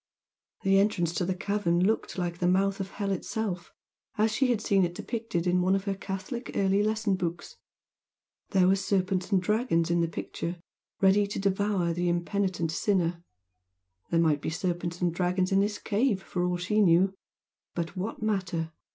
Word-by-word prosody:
The 195 Hz, 0 st, +4 dB
entrance 180 Hz, -5 st, +1 dB
to 180 Hz, -, 0 dB
the 185 Hz, +1 st, -1 dB
cavern 185 Hz, -2 st, +1 dB
looked 220 Hz, -1 st, 0 dB
like 175 Hz, -1 st, -2 dB
the 175 Hz, -, +1 dB
mouth 195 Hz, +2 st, +2 dB
of 195 Hz, -1 st, -3 dB
hell 200 Hz, -1 st, -3 dB
itself, 190 Hz, -1 st, -3 dB, 0.5 s
as 215 Hz, +1 st, +3 dB
she 265 Hz, +5 st, +2 dB
had 240 Hz, -4 st, +1 dB
seen 200 Hz, -3 st, +2 dB
it 175 Hz, 0 st, -1 dB
depicted 225 Hz, -7 st, -3 dB
in 180 Hz, 0 st, +2 dB
one 185 Hz, +2 st, +3 dB
of 195 Hz, -, -1 dB
her 200 Hz, -1 st, -1 dB
Catholic 195 Hz, +6 st, -5 dB
early 195 Hz, 0 st, +2 dB
lesson 215 Hz, -1 st, +1 dB
books. 175 Hz, -2 st, -4 dB, 0.9 s
There 185 Hz, -2 st, +4 dB
were 190 Hz, -, +5 dB
serpents 190 Hz, -1 st, 0 dB
and 195 Hz, -, +4 dB
dragons 180 Hz, -4 st, +1 dB
in 170 Hz, 0 st, +3 dB
the 170 Hz, -, +1 dB
picture 170 Hz, +1 st, -5 dB, 0.4 s
ready 200 Hz, +1 st, +4 dB
to 200 Hz, -, -5 dB
devour 195 Hz, -3 st, +1 dB
the 175 Hz, +1 st, 0 dB
impenitent 175 Hz, -1 st, -1 dB
sinner, 175 Hz, -2 st, 0 dB, 0.9 s
there 165 Hz, -, +2 dB
might 155 Hz, -3 st, +2 dB
be -, -, -2 dB
serpents 175 Hz, +1 st, -3 dB
and 175 Hz, -2 st, +1 dB
dragons 180 Hz, +1 st, 0 dB
in 195 Hz, -, +4 dB
this 205 Hz, +1 st, 0 dB
cave, 210 Hz, -2 st, 0 dB
for 175 Hz, -, -2 dB
all 180 Hz, 0 st, 0 dB
she 210 Hz, +4 st, +1 dB
knew! 185 Hz, +1 st, +4 dB, 0.6 s
But 170 Hz, +1 st, -3 dB
what 200 Hz, +4 st, -4 dB
matter? 180 Hz, -6 st, -1 dB
190 Hz, 175 wpm, -28 LUFS, 175-200 Hz, 0.9 s, were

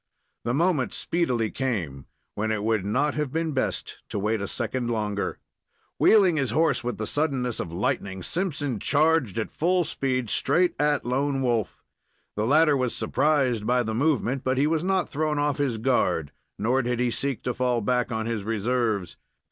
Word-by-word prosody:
The 120 Hz, +1 st, 0 dB
moment 165 Hz, -4 st, +1 dB
speedily 125 Hz, -10 st, 0 dB
came 90 Hz, -, -3 dB, 0.3 s
when 110 Hz, +1 st, -1 dB
it 105 Hz, -1 st, -1 dB
would 110 Hz, -3 st, +1 dB
not 135 Hz, +9 st, +1 dB
have 150 Hz, -3 st, -2 dB
been 160 Hz, +1 st, -1 dB
best 130 Hz, -2 st, -3 dB
to -, -, -4 dB
wait 105 Hz, +1 st, 0 dB
a 100 Hz, -, -3 dB
second 120 Hz, +2 st, -2 dB
longer. 105 Hz, -3 st, -2 dB, 0.6 s
Wheeling 190 Hz, -7 st, +5 dB
his 135 Hz, -4 st, 0 dB
horse 155 Hz, -5 st, +2 dB
with 125 Hz, -1 st, -3 dB
the 110 Hz, -, -3 dB
suddenness 135 Hz, -4 st, -1 dB
of 80 Hz, -, -4 dB
lightning, 95 Hz, -1 st, -2 dB
Simpson 145 Hz, -, -2 dB
charged 150 Hz, -, +2 dB
at 110 Hz, -, -2 dB
full 180 Hz, +2 st, +1 dB
speed 130 Hz, -6 st, -2 dB
straight 175 Hz, +5 st, +2 dB
at 150 Hz, 0 st, +1 dB
Lone 135 Hz, +2 st, 0 dB
Wolf. 115 Hz, -5 st, -1 dB, 0.5 s
The 105 Hz, +1 st, 0 dB
latter 150 Hz, +2 st, +5 dB
was 130 Hz, -3 st, -1 dB
surprised 125 Hz, -2 st, +1 dB
by 125 Hz, 0 st, +3 dB
the 110 Hz, -1 st, -3 dB
movement, 135 Hz, 0 st, 0 dB
but 130 Hz, 0 st, 0 dB
he 140 Hz, -, +3 dB
was 160 Hz, +1 st, +1 dB
not 190 Hz, -1 st, +1 dB
thrown 155 Hz, 0 st, -1 dB
off 145 Hz, -1 st, 0 dB
his 135 Hz, -5 st, 0 dB
guard, 90 Hz, -, +1 dB, 0.3 s
nor 125 Hz, +4 st, +1 dB
did 120 Hz, -1 st, -2 dB
he 125 Hz, -1 st, +1 dB
seek 135 Hz, +1 st, -2 dB
to 125 Hz, -, -1 dB
fall 125 Hz, -1 st, +1 dB
back 125 Hz, +3 st, 0 dB
on 110 Hz, -1 st, -2 dB
his 115 Hz, -3 st, -2 dB
reserves. 110 Hz, -3 st, -1 dB
125 Hz, 180 wpm, -25 LUFS, 110-145 Hz, 0.6 s, Wheeling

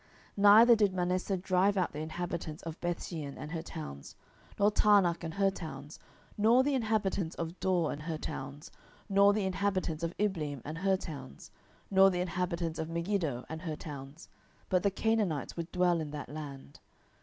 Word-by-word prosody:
07:001:027 200 Hz, -, -4 dB
Neither 220 Hz, +4 st, +8 dB
did 205 Hz, -3 st, +3 dB
Manasseh 185 Hz, +2 st, 0 dB
drive 185 Hz, +2 st, +2 dB
out 185 Hz, -, 0 dB
the 150 Hz, -, -5 dB
inhabitants 160 Hz, 0 st, -5 dB
of 165 Hz, -1 st, -7 dB
Bethshean 165 Hz, -4 st, -4 dB
and 150 Hz, -, -7 dB
her 165 Hz, -1 st, -3 dB
towns, 155 Hz, -, -8 dB, 0.4 s
nor 205 Hz, +1 st, +4 dB
Taanach 195 Hz, -6 st, +4 dB
and 165 Hz, -1 st, -5 dB
her 195 Hz, -1 st, +3 dB
towns, 150 Hz, -5 st, -8 dB, 0.4 s
nor 230 Hz, +5 st, +5 dB
the 285 Hz, +1 st, +1 dB
inhabitants 215 Hz, -8 st, 0 dB
of 170 Hz, +1 st, -5 dB
Dor 180 Hz, -4 st, +1 dB
and 145 Hz, -, -6 dB
her 160 Hz, 0 st, -3 dB
towns, 140 Hz, 0 st, -7 dB, 0.4 s
nor 200 Hz, 0 st, +5 dB
the 205 Hz, -1 st, 0 dB
inhabitants 190 Hz, -4 st, -1 dB
of 170 Hz, 0 st, -3 dB
Ibleam 155 Hz, -, -2 dB
and 155 Hz, +2 st, -5 dB
her 190 Hz, +1 st, +2 dB
towns, 140 Hz, -8 st, -9 dB, 0.4 s
nor 195 Hz, 0 st, +7 dB
the 180 Hz, -1 st, -1 dB
inhabitants 175 Hz, -2 st, -2 dB
of 160 Hz, -, -3 dB
Megiddo 170 Hz, -7 st, -1 dB
and 160 Hz, 0 st, -6 dB
her 160 Hz, -3 st, -4 dB
towns: 145 Hz, 0 st, -9 dB, 0.4 s
but 185 Hz, -1 st, +3 dB
the 200 Hz, -, +3 dB
Canaanites 200 Hz, -7 st, 0 dB
would 170 Hz, 0 st, -5 dB
dwell 180 Hz, -2 st, +2 dB
in 155 Hz, -, -5 dB
that 145 Hz, -3 st, -7 dB
land. 145 Hz, -2 st, -8 dB
175 Hz, 175 wpm, -31 LUFS, 155-195 Hz, 0.4 s, Neither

